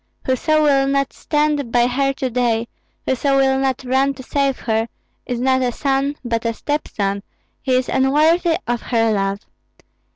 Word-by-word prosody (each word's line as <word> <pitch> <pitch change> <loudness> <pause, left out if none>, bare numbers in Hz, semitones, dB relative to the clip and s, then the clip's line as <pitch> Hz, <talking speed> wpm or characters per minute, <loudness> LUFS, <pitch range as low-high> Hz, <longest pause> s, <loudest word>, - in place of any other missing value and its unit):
Whoso 310 +4 +2
will 275 -2 +3
not 275 0 0
stand 295 -4 -1
by 240 0 +4
her 275 +3 +1
to 260 -1 -3
day, 235 -1 0 0.4
whoso 275 +2 +1
will 265 0 +3
not 265 -1 -1
run 265 +2 +1
to 260 - -10
save 275 0 0
her, 225 0 0 0.4
is 245 -2 -2
not 260 +1 +2
a 250 -1 +1
son, 275 +2 0
but 230 -1 -1
a 230 -1 -1
step 295 +4 -2
son; 200 -1 -2 0.4
he 260 -2 +1
is 255 0 +1
unworthy 315 +6 +3
of 240 -1 -1
her 225 -2 +1
love. 195 0 -1
265 Hz, 170 wpm, -19 LUFS, 240-275 Hz, 0.4 s, by